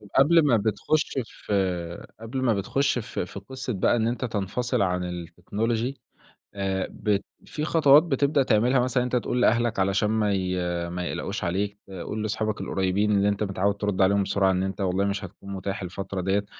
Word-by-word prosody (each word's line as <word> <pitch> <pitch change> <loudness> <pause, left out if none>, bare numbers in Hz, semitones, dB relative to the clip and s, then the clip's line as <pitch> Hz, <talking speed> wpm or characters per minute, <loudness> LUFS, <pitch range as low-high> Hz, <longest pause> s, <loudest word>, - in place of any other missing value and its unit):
قبل 155 +3 +6
ما 120 -5 +4
بتخُش 110 +9 0
في 90 -6 -3
قبل 115 +4 -4
ما 120 -3 +3
بتخُش 125 +7 0
في 105 - -4
في 100 - -8
قصّة 125 +4 -5
بقى 95 +5 +2
إن 115 -1 +1
أنت 120 +2 -1
تنفصل 115 +2 -1
عن 90 -2 -1
الtechnology، 110 +8 -2 0.6
آآ 95 -1 -1
ب 105 -2 0 0.3
في 150 - -5
خطوات 150 -2 +6
بتبدأ 140 -2 +2
تعملها 125 +2 +3
مثلًا 125 0 +1
إن - - -1
أنت 125 - -1
تقول 125 0 0
لأهلك 120 -2 +2
علشان 100 +2 +2
ما 105 -2 +1
ي 95 -1 -1 0.3
ما 90 +1 -4
يقلَقوش - - -3
عليك، 100 +4 -1
تقُول 95 +3 -5
لاصحابك 110 0 -2
القريّبين 95 +2 0
اللي 100 +1 +3
أنت 100 +1 -1
متعوّد 100 0 0
ترُد 100 -2 -1
عليهم 100 +1 +4
بسرعة 95 0 +2
إن 95 0 0
أنت 95 +1 -3
والله 95 +1 +1
مش 100 0 -2
هتكون 100 +2 -10
مُتاح 95 +1 -4
الفترة 95 +1 -4
دِيَّة. 95 +2 0
100 Hz, 180 wpm, -26 LUFS, 95-120 Hz, 0.6 s, قبل